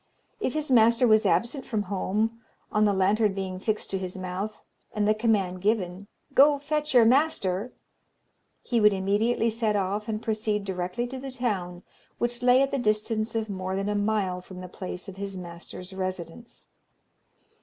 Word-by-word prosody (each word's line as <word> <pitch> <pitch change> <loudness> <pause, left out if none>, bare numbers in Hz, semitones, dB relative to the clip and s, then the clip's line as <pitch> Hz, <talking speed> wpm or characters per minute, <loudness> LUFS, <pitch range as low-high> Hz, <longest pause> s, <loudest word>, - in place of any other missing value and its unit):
If 260 - -1
his 305 -2 -2
master 235 +1 +5
was 215 -1 +5
absent 235 - +1
from 215 -4 -2
home, 210 +4 -1 0.3
on 210 0 +3
the 205 - +4
lantern 200 +2 +2
being 190 -1 -4
fixed 215 +2 -2
to 195 - -1
his 185 0 -5
mouth, 185 +3 -4 0.4
and 210 -1 +1
the 215 - +5
command 205 -5 0
given, 195 -2 -1 0.3
"Go, 285 +2 +6
fetch 300 0 -2
your 235 -2 +8
master," 235 -6 +2 0.9
he 235 -2 +1
would 210 -1 +6
immediately 210 +4 +1
set 220 -1 0
off 200 +2 -1
and 215 -1 -2
proceed 215 -2 -1
directly 185 +5 -2
to 260 +2 -6
the 270 +1 -6
town, 195 -9 -2 0.3
which 240 0 -1
lay 250 +2 +5
at 275 - -1
the 275 - 0
distance 215 0 0
of 220 -1 -1
more 190 -2 -3
than 195 +1 -1
a - - 0
mile 205 -3 0
from 185 0 -12
the 185 0 -7
place 180 +1 -7
of 195 -1 -9
his 195 -1 -5
master's 180 +1 -9
residence. 185 +3 -6
210 Hz, 175 wpm, -27 LUFS, 190-230 Hz, 0.9 s, your